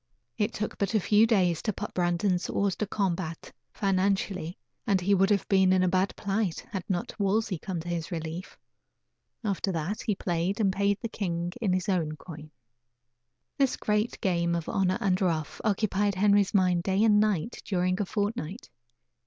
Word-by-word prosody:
It 210 Hz, +2 st, 0 dB
took 215 Hz, -1 st, -4 dB
but 200 Hz, +2 st, 0 dB
a -, -, +5 dB
few 210 Hz, +3 st, +4 dB
days 180 Hz, -7 st, +2 dB
to 215 Hz, -, 0 dB
put 210 Hz, +1 st, -6 dB
Brandon 175 Hz, +1 st, +1 dB
hors 200 Hz, -2 st, 0 dB
de 215 Hz, -, -2 dB
combat, 180 Hz, -5 st, -2 dB, 0.2 s
financially, 195 Hz, -3 st, 0 dB, 0.3 s
and 200 Hz, -3 st, +3 dB
he 190 Hz, +3 st, +2 dB
would 195 Hz, 0 st, +4 dB
have 205 Hz, -2 st, +1 dB
been 190 Hz, -1 st, +4 dB
in 185 Hz, 0 st, +4 dB
a -, -, +3 dB
bad 185 Hz, +2 st, +1 dB
plight 200 Hz, -3 st, -2 dB
had 190 Hz, -3 st, -3 dB
not 180 Hz, +3 st, -3 dB
Wolsey 200 Hz, -2 st, +1 dB
come 185 Hz, -2 st, -4 dB
to 170 Hz, -, -10 dB
his 170 Hz, -2 st, -3 dB
relief. 165 Hz, +2 st, -5 dB, 0.9 s
After 200 Hz, -2 st, -1 dB
that, 170 Hz, +5 st, -3 dB
he 215 Hz, -4 st, 0 dB
played 180 Hz, +3 st, -1 dB
and 195 Hz, -3 st, +2 dB
paid 200 Hz, +1 st, +1 dB
the 230 Hz, -, -2 dB
king 175 Hz, -5 st, -3 dB
in 205 Hz, -5 st, +1 dB
his 185 Hz, -1 st, -1 dB
own 170 Hz, -6 st, 0 dB
coin. 155 Hz, -1 st, -10 dB, 1.1 s
This 275 Hz, -2 st, +2 dB
great 210 Hz, +2 st, 0 dB
game 170 Hz, -4 st, +1 dB
of 170 Hz, -2 st, -3 dB
"honor 185 Hz, -1 st, +1 dB
and 190 Hz, -1 st, +1 dB
ruff" 160 Hz, -5 st, -1 dB
occupied 205 Hz, -1 st, +1 dB
Henry's 200 Hz, 0 st, +3 dB
mind 180 Hz, -3 st, +3 dB
day 190 Hz, +3 st, +1 dB
and 210 Hz, -2 st, +5 dB
night 210 Hz, 0 st, 0 dB
during 185 Hz, 0 st, 0 dB
a -, -, 0 dB
fortnight. 205 Hz, -2 st, -3 dB
190 Hz, 180 wpm, -28 LUFS, 175-205 Hz, 1.1 s, a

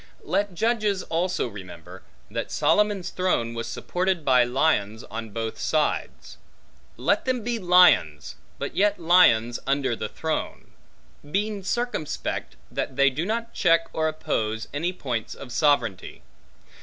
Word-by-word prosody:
Let 205 Hz, -, -1 dB
judges 215 Hz, -2 st, 0 dB
also 175 Hz, -2 st, -1 dB
remember, 95 Hz, -3 st, -10 dB, 0.3 s
that -, -, -4 dB
Solomon's 205 Hz, -4 st, +1 dB
throne 150 Hz, -11 st, 0 dB
was 115 Hz, 0 st, -4 dB
supported 180 Hz, +1 st, -2 dB
by 125 Hz, -2 st, +5 dB
lions 120 Hz, -4 st, 0 dB
on 115 Hz, 0 st, -7 dB
both 110 Hz, +1 st, -4 dB
sides: 155 Hz, -1 st, -1 dB, 0.6 s
let -, -, +1 dB
them 255 Hz, -3 st, -1 dB
be 235 Hz, 0 st, -2 dB
lions, 180 Hz, -, +4 dB, 0.2 s
but -, -, -5 dB
yet 205 Hz, +1 st, +2 dB
lions 140 Hz, -10 st, +4 dB
under 135 Hz, -3 st, +1 dB
the 110 Hz, -1 st, -5 dB
throne; 160 Hz, +6 st, -4 dB, 0.6 s
being 205 Hz, +4 st, -1 dB
circumspect 215 Hz, -6 st, -3 dB, 0.2 s
that 130 Hz, -, -3 dB
they 140 Hz, 0 st, +4 dB
do 155 Hz, +7 st, -3 dB
not 230 Hz, +1 st, -3 dB
check 165 Hz, 0 st, +3 dB
or 160 Hz, 0 st, 0 dB
oppose 110 Hz, -8 st, -2 dB
any 165 Hz, +5 st, -1 dB
points 125 Hz, -11 st, -4 dB
of 130 Hz, -3 st, -10 dB
sovereignty. 115 Hz, -, 0 dB
155 Hz, 130 wpm, -25 LUFS, 115-190 Hz, 0.6 s, by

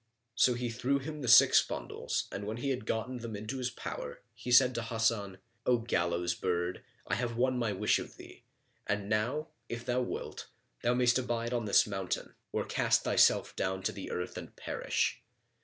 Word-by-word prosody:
So 125 Hz, +1 st, +4 dB
he 120 Hz, -1 st, -2 dB
threw 125 Hz, +4 st, +1 dB
him 150 Hz, +2 st, -6 dB
the 125 Hz, -, -4 dB
six -, -, +8 dB
bundles -, -, -3 dB
and 100 Hz, +1 st, -5 dB
when 110 Hz, +2 st, -3 dB
he 140 Hz, +3 st, -1 dB
had 125 Hz, -4 st, -3 dB
gotten 125 Hz, +3 st, -2 dB
them 115 Hz, -2 st, -6 dB
into 110 Hz, +6 st, -5 dB
his 125 Hz, -1 st, -1 dB
power 120 Hz, -, -7 dB
he 125 Hz, -, -6 dB
said 125 Hz, +1 st, +7 dB
to 115 Hz, -, -2 dB
Hasan, 110 Hz, -4 st, 0 dB, 0.3 s
"O 125 Hz, -, +5 dB
gallows 85 Hz, -6 st, 0 dB
bird, 90 Hz, 0 st, -2 dB, 0.2 s
I -, -, -3 dB
have 120 Hz, -2 st, -1 dB
won 130 Hz, 0 st, +2 dB
my 115 Hz, -3 st, 0 dB
wish 105 Hz, +2 st, +2 dB
of -, -, -9 dB
thee; -, -, -13 dB, 0.5 s
and 100 Hz, 0 st, -1 dB
now, 120 Hz, +9 st, 0 dB, 0.2 s
if 115 Hz, 0 st, -5 dB
thou 125 Hz, +1 st, +1 dB
wilt, 125 Hz, -, -5 dB, 0.3 s
thou 120 Hz, +1 st, +2 dB
mayst 125 Hz, 0 st, +4 dB
abide 120 Hz, -1 st, -2 dB
on 120 Hz, -2 st, -1 dB
this 100 Hz, -, +5 dB
mountain, 95 Hz, -3 st, -3 dB, 0.2 s
or -, -, -1 dB
cast -, -, +2 dB
thyself -, -, +4 dB
down 95 Hz, 0 st, -2 dB
to -, -, 0 dB
the 100 Hz, -, -7 dB
earth 90 Hz, 0 st, -4 dB
and -, -, -11 dB
perish. -, -, -1 dB
115 Hz, 190 wpm, -31 LUFS, 100-125 Hz, 0.5 s, six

